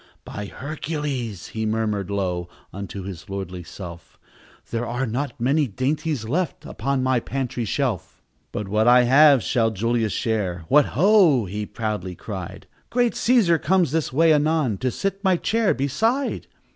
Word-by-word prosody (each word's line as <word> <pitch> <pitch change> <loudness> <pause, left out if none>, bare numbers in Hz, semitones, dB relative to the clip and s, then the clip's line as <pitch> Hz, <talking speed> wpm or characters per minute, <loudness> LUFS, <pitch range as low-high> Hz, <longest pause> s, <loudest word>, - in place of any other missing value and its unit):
"By 105 - -6
Hercules!" 140 - -4
he 110 - -4
murmured 105 -3 -1
low 90 -3 -2 0.2
Unto 100 0 -6
his 95 -2 -8
lordly 95 -2 -5
self, 85 0 -10 0.5
"There 115 +1 -2
are 125 +3 -1
not 130 +5 -3
many 140 +5 +2
dainties 135 - -2
left 165 +6 -2
Upon 135 -1 -2
my 130 -1 +2
pantry 125 -1 -3
shelf! 120 - -2 0.3
"But 105 - -4
what 105 +3 +1
I 125 0 +7
have 140 +1 +6
shall 115 -2 +2
Julius 115 +1 0
share. 95 -8 -2
What, 145 0 +6
ho!" 175 - +5
he 105 +3 -4
proudly 105 -5 -4
cried, - - -7 0.2
"Great 245 -1 +2
Cæsar 215 -10 +3
comes 185 -6 +2
this 160 -2 0
way 160 +4 +4
anon 150 -7 +1
To 130 - 0
sit 195 - -3
my 190 -2 +3
chair 220 +4 +1
beside. 220 - 0
125 Hz, 150 wpm, -23 LUFS, 105-155 Hz, 0.5 s, I